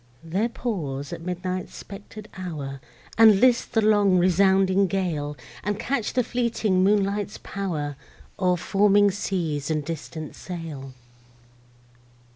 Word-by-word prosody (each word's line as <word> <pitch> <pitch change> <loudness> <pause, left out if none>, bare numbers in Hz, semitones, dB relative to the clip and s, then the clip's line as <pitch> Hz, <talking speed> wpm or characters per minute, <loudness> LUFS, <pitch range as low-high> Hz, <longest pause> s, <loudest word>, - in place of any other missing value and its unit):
There 190 +8 0
pause 150 - -4
at 165 - -6
midnight's 180 +1 -4
spectred 205 +1 -10
hour, 145 -7 -6 0.4
And 220 -3 +8
list 245 0 +3
the 225 - +3
long 205 -3 +4
resounding 190 +2 +4
gale; 160 -6 -2 0.3
And 205 +1 -1
catch 245 -4 -1
the 250 - +2
fleeting 225 -6 +1
moonlight's 200 0 +1
pow'r, 155 -8 -4 0.4
O'er 180 -1 +2
foaming 205 +3 +4
seas 165 -7 -2
and 155 -2 -1
distant 160 -1 -6
sail. 160 -7 -7
185 Hz, 115 wpm, -25 LUFS, 160-205 Hz, 0.4 s, And